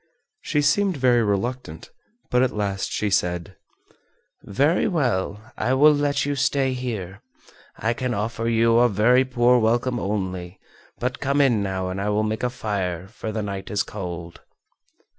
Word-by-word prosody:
She 150 -2 0
seemed 185 +4 +2
very 125 -2 +3
reluctant, 105 -3 -3 0.4
but 125 - +3
at 130 -3 +1
last 100 -2 -2
she 105 -1 -1
said: 90 -3 -1 0.9
"Very 140 - +1
well, 115 - -1
I 130 - +1
will 150 +3 +6
let 145 -1 0
you 145 - -1
stay 135 0 +1
here. 105 -6 -5 0.6
I 110 +1 0
can 125 0 -2
offer 115 +2 -2
you 115 0 +3
a 120 0 +5
very 120 +5 +4
poor 125 -1 +3
welcome 120 +2 +1
only, 95 -3 -4 0.4
but 125 +1 -3
come 140 +1 0
in 125 -7 +3
now 95 -2 -2
and 95 +1 -4
I 105 - -1
will 105 +1 +1
make 110 +1 -2
a 125 - 0
fire, 95 -7 -3
for 110 -1 -6
the 110 0 -3
night 100 -1 -5
is 105 -2 0
cold." 85 -4 -7
115 Hz, 160 wpm, -23 LUFS, 100-130 Hz, 0.9 s, will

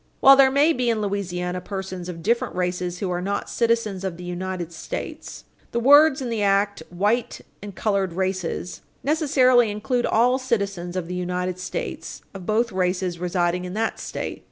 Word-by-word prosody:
While 275 0 +9
there 270 -1 +6
may 285 +4 +4
be 250 -4 0
in 225 -2 +1
Louisiana 180 -3 -2
persons 190 -2 -6
of 165 -2 -7
different 235 +5 0
races 180 -1 -2
who 185 -1 -3
are 175 0 -1
not 200 +2 -3
citizens 230 -5 0
of 185 -3 -3
the 180 - -9
United 180 -1 -4
States, 160 - -6 0.3
the 235 - +1
words 285 +2 +6
in 245 - -3
the 225 -2 -1
act 200 -1 +2
"white 210 +7 0 0.2
and 205 -2 -8
colored 195 -4 0
races" 185 -1 -3 0.2
necessarily 260 -6 +4
include 240 +4 -1
all 250 +3 +3
citizens 200 -8 -2
of 180 -3 -3
the 180 - -5
United 180 0 -2
States 185 - -5
of 190 -3 -9
both 230 +2 +1
races 180 -1 -1
residing 180 0 0
in 180 +1 -6
that 225 +1 -1
State. - - -5
195 Hz, 175 wpm, -23 LUFS, 180-235 Hz, 0.3 s, While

